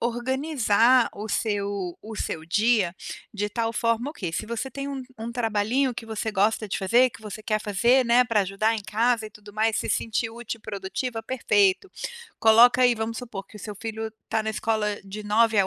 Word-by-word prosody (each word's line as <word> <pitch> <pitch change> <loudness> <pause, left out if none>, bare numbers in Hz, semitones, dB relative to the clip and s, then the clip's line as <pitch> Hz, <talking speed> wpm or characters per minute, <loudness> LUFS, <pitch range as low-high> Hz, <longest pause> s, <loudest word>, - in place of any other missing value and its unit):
organizar 245 -1 +2
o 210 +2 -6
seu 200 -4 -2
o 220 0 -8
seu 160 - -3
dia 205 0 +2 0.4
de 210 -1 -1
tal 225 +1 -1
forma 230 +3 0
ok, 185 - -5
se 215 +6 -3
você 235 +3 -4
tem 275 +1 -5
um 275 -2 -4 0.2
um 230 +1 -5
trabalhinho 235 +3 0
que 225 -1 -7
você 220 0 -3
gosta 210 +2 +1
de 200 - -3
fazer, 240 +7 +4
que 205 - -14
você 215 0 -8
quer 215 0 0
fazer, 235 +6 +3
né, 240 +1 +5
pra 225 -3 +2
ajudar 195 +4 +1
em 220 - -3
casa 220 +2 +1
e 215 - -11
tudo 205 0 -14
mais, 220 0 +1
se - - -2
sentir 225 0 -1
útil 230 0 -6
e - - -29
produtiva, 225 +4 -4
perfeito. 215 - +2 0.5
Coloca 235 +3 +7
aí, 245 -1 +5
vamos 220 0 -3
supor, 225 -6 -7
que 210 - -14
o - - -10
seu 210 0 -7
filho 220 +1 -4 0.2
está 220 - -1
na 220 - -3
escola 215 -1 -1
de 200 +2 -7
9h 210 -1 +3
à - - -2
220 Hz, 205 wpm, -25 LUFS, 210-235 Hz, 0.5 s, Coloca